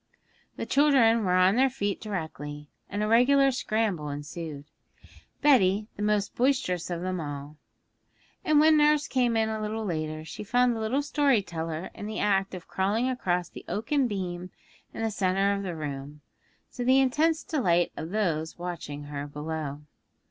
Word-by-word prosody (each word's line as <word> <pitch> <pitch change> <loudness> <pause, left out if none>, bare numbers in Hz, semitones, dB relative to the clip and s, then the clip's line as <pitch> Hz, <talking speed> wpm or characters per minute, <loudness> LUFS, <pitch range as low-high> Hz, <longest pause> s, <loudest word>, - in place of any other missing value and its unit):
The - - -4
children 260 -6 +4
were 180 -1 +2
on 185 +4 +4
their 265 +1 +4
feet 205 -6 -3
directly, 150 -7 -6 0.2
and 205 +2 -2
a - - 0
regular 270 +5 +5
scramble 215 - -1
ensued, 145 0 -6 0.8
Betty 210 -7 +4
the - - -7
most 210 -1 +1
boisterous 245 -10 0
of 175 0 -3
them 185 -1 -2
all. 145 0 -7 0.9
And 305 -1 +4
when 310 +1 +6
nurse 300 0 +4
came 245 -3 +1
in 220 0 +2
a 220 0 -3
little 215 +1 -3
later, 155 -3 -3
she 165 - -7
found 245 +3 +2
the - - -4
little 240 +6 0
story 285 -7 +2
teller 165 -1 -5
in 205 - -7
the 215 0 -5
act 195 -2 +1
of 180 - -10
crawling 205 +6 0
across 180 -9 -1
the - - -11
oaken 255 +5 0
beam 180 -4 -4 0.4
in - - -5
the 225 - 0
centre 195 0 +1
of 200 - -2
the 185 -4 -4
room, 145 -1 -6 0.5
to 245 - -4
the 260 +2 +5
intense 310 +5 +2
delight 175 - +1
of 160 - -5
those 170 -6 -1
watching 170 -5 -6
her 145 0 -5
below. 150 -1 -5
200 Hz, 170 wpm, -27 LUFS, 160-245 Hz, 0.9 s, when